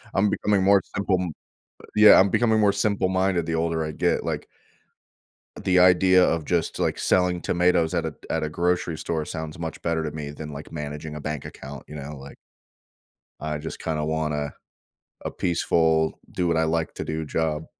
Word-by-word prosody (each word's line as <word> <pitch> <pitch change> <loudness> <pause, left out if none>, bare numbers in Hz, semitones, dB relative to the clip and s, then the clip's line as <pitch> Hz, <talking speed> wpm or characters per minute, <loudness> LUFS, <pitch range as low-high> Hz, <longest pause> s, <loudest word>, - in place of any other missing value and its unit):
I'm 100 +2 +3
becoming 100 -2 +1
more 100 0 +5
simple 100 -1 +1
m 90 - -3 0.6
yeah, 105 -2 +8
I'm 100 - +5
becoming 110 +1 +2
more 100 -2 +4
simple 100 -2 +1
minded 95 -2 +1
the 80 - -1
older 80 0 0
I 75 - -4
get, - - 0
like - - -3 1.2
the 90 -1 +2
idea 90 0 +6
of 80 -2 0
just, 85 0 -1
like, - - 0
selling 90 -1 +2
tomatoes 85 -2 +2
at - - 0
a - - -6 0.2
at 80 - 0
a 75 - -2
grocery 85 0 0
store 80 0 -2
sounds 80 0 -6
much 80 -1 -5
better 80 -1 0
to 75 - -2
me 75 -1 -6
than, 75 +1 -8
like, 75 +1 -9
managing 75 0 -6
a 75 - -6
bank 75 -2 -4
account, 70 0 -9
you 75 - -10
know, 75 +1 -7
like 70 +1 -11 1.0
I 75 0 -3
just 80 +2 -7
kinda 80 -2 -2
want 80 -1 -1
a 75 -1 -3 0.7
a - - -2
peaceful 80 -2 +1
"do 90 - -1
what 85 -1 +1
I 80 - +3
like 80 0 -1
to - - -4
do" 80 0 -3
job. 80 0 -1
80 Hz, 190 wpm, -24 LUFS, 75-90 Hz, 1.2 s, yeah